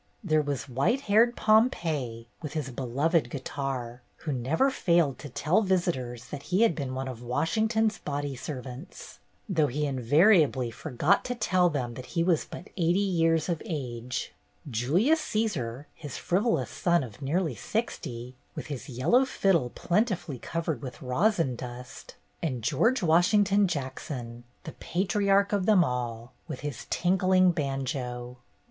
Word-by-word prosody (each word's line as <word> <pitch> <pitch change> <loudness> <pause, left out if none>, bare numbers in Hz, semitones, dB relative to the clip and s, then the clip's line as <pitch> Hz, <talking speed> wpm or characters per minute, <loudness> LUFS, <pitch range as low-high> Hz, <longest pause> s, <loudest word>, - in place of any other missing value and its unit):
There 155 -5 +3
was 145 -2 -3
white 140 - +1
haired 230 +2 +4
Pompey, 160 - +1
with 150 -3 -6
his 150 -5 -3
beloved 140 +7 0
guitar, 130 -3 -4
who 155 - -5
never 140 - +1
failed 170 - +2
to 145 - -8
tell 155 - +2
visitors 150 - -1
that 145 - -6
he 190 +5 +3
had 230 - +4
been 135 -5 -4
one 130 0 -3
of 125 -3 -7
Washington's 220 - +1
body 145 -1 -3
servants, 130 +3 -8 0.3
though 160 -7 +2
he 150 +3 -1
invariably 140 - +3
forgot 150 +9 +1
to 250 - -2
tell 185 -6 +2
them 130 -6 -3
that 125 +1 -9
he 165 - +4
was 170 -3 +2
but 180 - -10
eighty 175 0 +2
years 165 -5 +2
of 170 -3 -1
age; 125 - -4 0.3
J 120 -2 -2
ulius 220 - +4
Caesar, 150 - -2
his 145 -5 -8
frivolous 205 +6 0
son 175 -4 +2
of 115 0 -10
nearly 155 +2 0
sixty, 125 - -4 0.2
with - - -5
his 135 - -8
yellow 145 - +3
fiddle 190 - +1
plentifully 180 - -1
covered 165 -5 -3
with 130 0 -8
rosin 160 - +1
dust; 125 +1 -9 0.3
and 130 -8 -2
George 190 - +2
Washington 195 +4 +4
Jackson, 130 -5 -5 0.2
the 155 - -7
patriarch 200 +3 +1
of 195 -2 +1
them 205 -5 +6
all, 120 -3 -3
with - - -6
his 145 -3 -6
tinkling 185 0 +3
banjo. 130 -5 -3
150 Hz, 145 wpm, -28 LUFS, 125-185 Hz, 0.3 s, them